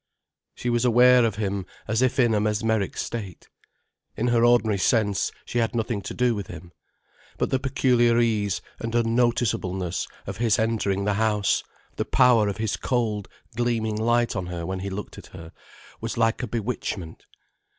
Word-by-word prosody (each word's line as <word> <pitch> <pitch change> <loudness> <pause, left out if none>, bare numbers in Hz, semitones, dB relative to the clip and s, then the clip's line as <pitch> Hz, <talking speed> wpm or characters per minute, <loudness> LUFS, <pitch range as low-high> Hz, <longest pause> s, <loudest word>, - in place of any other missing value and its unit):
She 120 - -2
was 120 0 +1
aware 125 +1 +6
of 110 -3 0
him 100 -2 -3 0.2
as 110 +2 0
if 130 -1 +1
in 120 -3 +4
a 105 - +2
mesmeric 105 -1 0
state. 100 -7 -6 0.7
In 120 +2 0
her 120 -1 +3
ordinary 115 -4 +3
sense, 105 -1 +1
she 120 - -2
had 115 0 0
nothing 115 -2 -1
to - - -7
do 125 -1 +2
with 100 -3 -5
him. 85 - -10 0.7
But - - -1
the 130 - +2
peculiar 125 -3 +2
ease 105 -5 0 0.2
and 115 0 -4
unnoticeableness 115 -6 0 0.2
of - - -6
his 115 -3 +2
entering 105 -3 0
the 105 - +1
house, 105 -2 +1 0.3
the - - -1
power 125 -5 +4
of 100 - -3
his 110 -1 -1
cold, 110 -6 -1 0.3
gleaming 115 -2 0
light 120 +2 +1
on 90 - -3
her 85 -1 -5
when 95 +1 -3
he 100 +1 -4
looked 100 +2 -7
at - - -13
her, 80 0 -11 0.5
was 115 +2 -4
like 115 +1 +1
a 125 - -3
bewitchment. 105 -7 -4
110 Hz, 170 wpm, -25 LUFS, 100-120 Hz, 0.7 s, aware